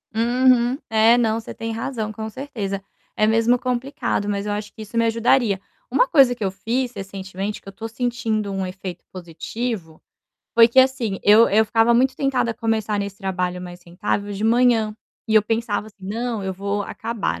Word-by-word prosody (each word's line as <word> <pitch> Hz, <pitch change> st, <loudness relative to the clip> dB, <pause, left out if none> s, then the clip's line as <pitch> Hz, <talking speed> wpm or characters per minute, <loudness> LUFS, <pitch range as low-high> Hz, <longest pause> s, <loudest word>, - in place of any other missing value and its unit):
Uhum. 245 Hz, +2 st, +3 dB
É, 225 Hz, +1 st, +5 dB
não, 225 Hz, -2 st, +1 dB
você 225 Hz, -, -8 dB
tem 225 Hz, 0 st, -5 dB
razão, 225 Hz, -2 st, -3 dB
com 220 Hz, 0 st, -6 dB
certeza. 215 Hz, -6 st, -5 dB, 0.3 s
É 215 Hz, -, +3 dB
mesmo 230 Hz, +2 st, +3 dB
complicado, 250 Hz, -4 st, -2 dB
mas 200 Hz, 0 st, -2 dB
eu 210 Hz, -, -2 dB
acho 210 Hz, 0 st, -5 dB
que 220 Hz, -, -11 dB
isso 215 Hz, +2 st, -7 dB
me 230 Hz, -, +3 dB
ajudaria. 230 Hz, -2 st, +2 dB, 0.3 s
Uma -, -, +3 dB
coisa 270 Hz, -, +5 dB
que 230 Hz, -, -5 dB
eu 190 Hz, -, 0 dB
fiz 245 Hz, +5 st, -2 dB
recentemente, 195 Hz, 0 st, -5 dB
que -, -, -22 dB
eu -, -, -6 dB
tô 225 Hz, +3 st, -6 dB
sentindo 225 Hz, -3 st, -2 dB
um 195 Hz, -1 st, -2 dB
efeito 185 Hz, -1 st, -7 dB
positivo, 180 Hz, +1 st, -5 dB, 0.5 s
foi 230 Hz, 0 st, +7 dB
que, 240 Hz, -, +1 dB
assim, 255 Hz, -7 st, +3 dB
eu 215 Hz, +3 st, +7 dB
eu 220 Hz, +2 st, +4 dB
ficava 225 Hz, +2 st, +3 dB
muito 260 Hz, +2 st, +3 dB
tentada 260 Hz, -4 st, 0 dB
a -, -, -4 dB
começar 220 Hz, -2 st, -1 dB
nesse 200 Hz, -1 st, -4 dB
trabalho 180 Hz, -2 st, -2 dB
mais 180 Hz, 0 st, -9 dB
rentável, 200 Hz, +4 st, -3 dB
de 200 Hz, +2 st, -3 dB
manhã 230 Hz, -2 st, +3 dB, 0.3 s
e 220 Hz, -, 0 dB
eu 215 Hz, -, +7 dB
pensava 225 Hz, -1 st, -1 dB
assim: 215 Hz, -, -16 dB
"Não, 225 Hz, +3 st, -3 dB
eu 190 Hz, -, -2 dB
vou 200 Hz, +2 st, -2 dB
acabar, 230 Hz, 0 st, -3 dB
220 Hz, 190 wpm, -22 LUFS, 200-240 Hz, 0.5 s, foi